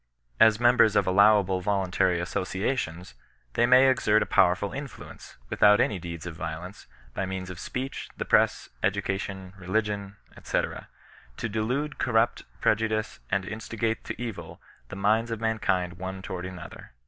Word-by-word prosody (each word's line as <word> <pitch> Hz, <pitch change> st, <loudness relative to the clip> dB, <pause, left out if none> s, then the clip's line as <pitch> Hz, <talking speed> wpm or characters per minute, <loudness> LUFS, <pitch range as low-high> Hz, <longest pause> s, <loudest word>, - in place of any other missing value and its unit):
As 110 Hz, -1 st, +6 dB
members 120 Hz, -3 st, +5 dB
of -, -, +3 dB
allowable 95 Hz, -1 st, +4 dB
voluntary 95 Hz, -2 st, +1 dB
associations, 90 Hz, -, -3 dB, 0.4 s
they 120 Hz, -, +3 dB
may 130 Hz, +2 st, +7 dB
exert 110 Hz, -5 st, +3 dB
a -, -, -6 dB
powerful 95 Hz, +2 st, +2 dB
influence, 140 Hz, 0 st, -9 dB
without 105 Hz, 0 st, +5 dB
any 100 Hz, -, +1 dB
deeds 85 Hz, -1 st, -7 dB
of 85 Hz, -2 st, -6 dB
violence, 85 Hz, +4 st, -7 dB, 0.3 s
by 100 Hz, -, -2 dB
means 95 Hz, -1 st, -5 dB
of 90 Hz, -, -9 dB
speech, 130 Hz, +2 st, -5 dB
the -, -, -3 dB
press, -, -, +2 dB
education, 95 Hz, -1 st, -2 dB
religion, 100 Hz, +1 st, -2 dB, 0.3 s
&c., -, -, 0 dB, 0.8 s
to -, -, -2 dB
delude, 125 Hz, +8 st, -2 dB
corrupt, 115 Hz, -1 st, +1 dB, 0.2 s
prejudice, 110 Hz, 0 st, 0 dB
and 95 Hz, -1 st, 0 dB
instigate 110 Hz, +2 st, -3 dB
to -, -, -6 dB
evil 95 Hz, -9 st, -6 dB, 0.3 s
the -, -, -7 dB
minds 110 Hz, +4 st, +2 dB
of 115 Hz, -2 st, -3 dB
mankind 95 Hz, -6 st, -1 dB
one 95 Hz, +1 st, -6 dB
toward 90 Hz, -1 st, -5 dB
another. 90 Hz, -8 st, -10 dB
100 Hz, 145 wpm, -27 LUFS, 95-110 Hz, 0.8 s, may